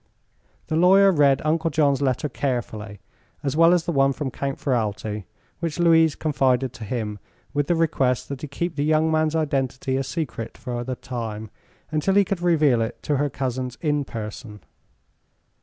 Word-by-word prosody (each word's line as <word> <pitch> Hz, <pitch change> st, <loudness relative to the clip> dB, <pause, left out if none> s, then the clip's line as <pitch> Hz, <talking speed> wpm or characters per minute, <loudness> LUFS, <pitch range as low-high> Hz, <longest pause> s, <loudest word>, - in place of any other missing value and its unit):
The 155 Hz, -, -2 dB
lawyer 190 Hz, +4 st, +6 dB
read 140 Hz, -5 st, +3 dB
Uncle 160 Hz, +1 st, +1 dB
John's 145 Hz, -2 st, +2 dB
letter 135 Hz, +2 st, 0 dB
carefully, 115 Hz, -6 st, -4 dB, 0.4 s
as 140 Hz, -1 st, -1 dB
well 165 Hz, +1 st, +6 dB
as 175 Hz, -2 st, +2 dB
the -, -, -1 dB
one 135 Hz, -2 st, +3 dB
from 135 Hz, -2 st, -4 dB
Count 140 Hz, +1 st, -3 dB
Ferralti, 110 Hz, -5 st, -2 dB, 0.3 s
which 165 Hz, -2 st, -3 dB
Louise 165 Hz, -3 st, +4 dB
confided 130 Hz, -4 st, +1 dB
to 115 Hz, -, -9 dB
him 105 Hz, -2 st, -3 dB, 0.3 s
with 145 Hz, -1 st, 0 dB
the 175 Hz, -, +2 dB
request 135 Hz, -6 st, +1 dB
that 140 Hz, -2 st, -5 dB
he 150 Hz, -, -5 dB
keep 170 Hz, +4 st, -4 dB
the 145 Hz, -, +1 dB
young 155 Hz, +1 st, +2 dB
man's 155 Hz, 0 st, +1 dB
identity 135 Hz, -3 st, -1 dB
a 135 Hz, -, 0 dB
secret 135 Hz, -5 st, -5 dB
for 125 Hz, -2 st, -5 dB
a 125 Hz, +1 st, -3 dB
time, 110 Hz, -4 st, -6 dB, 0.4 s
until 155 Hz, +5 st, +1 dB
he 200 Hz, -1 st, +5 dB
could 185 Hz, -2 st, -3 dB
reveal 155 Hz, -9 st, +3 dB
it 115 Hz, -, -4 dB
to 145 Hz, -, 0 dB
her 145 Hz, +1 st, +1 dB
cousins 130 Hz, -1 st, -3 dB
in 150 Hz, -2 st, 0 dB
person. 105 Hz, -3 st, -7 dB
140 Hz, 175 wpm, -23 LUFS, 125-160 Hz, 0.4 s, lawyer